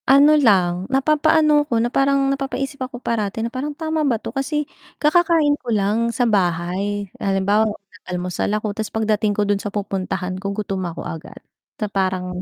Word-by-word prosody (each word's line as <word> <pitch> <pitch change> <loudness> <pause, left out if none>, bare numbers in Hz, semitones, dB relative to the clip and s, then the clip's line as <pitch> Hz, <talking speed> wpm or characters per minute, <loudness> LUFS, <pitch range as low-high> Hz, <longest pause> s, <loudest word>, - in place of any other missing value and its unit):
Ano 280 +3 +7
lang. 190 -9 +3
Napapaano 300 +2 +3
'ko 235 - +1
na 235 +2 0
parang 275 0 +2
napapaisip 275 0 -4
ako 255 0 -4
parati, 225 -3 -2
na 235 - -5
parang 290 +3 -4
tama 315 -1 -1
ba 270 -6 +2
'to - - -8
kasi 295 +2 -1 0.3
kakakain 320 -1 +3
ko 245 - -8
lang 215 +2 +1
sa 240 +2 0
bahay. 195 0 0 0.2
Halimbawa 200 +3 +2
nag-almusal 185 -3 -5
ako 215 -1 -3
tapos 215 +1 -4
pagdating 215 -1 +1
ko 210 - +2
dun 205 0 0
sa 205 - -4
pupuntahan 190 -2 -3
ko 200 +1 -4
gutom 195 -4 -2
ako 165 - -7
agad. 160 +1 -8 0.4
Na 215 - -2
parang 185 -2 -2
215 Hz, 170 wpm, -21 LUFS, 195-275 Hz, 0.4 s, Ano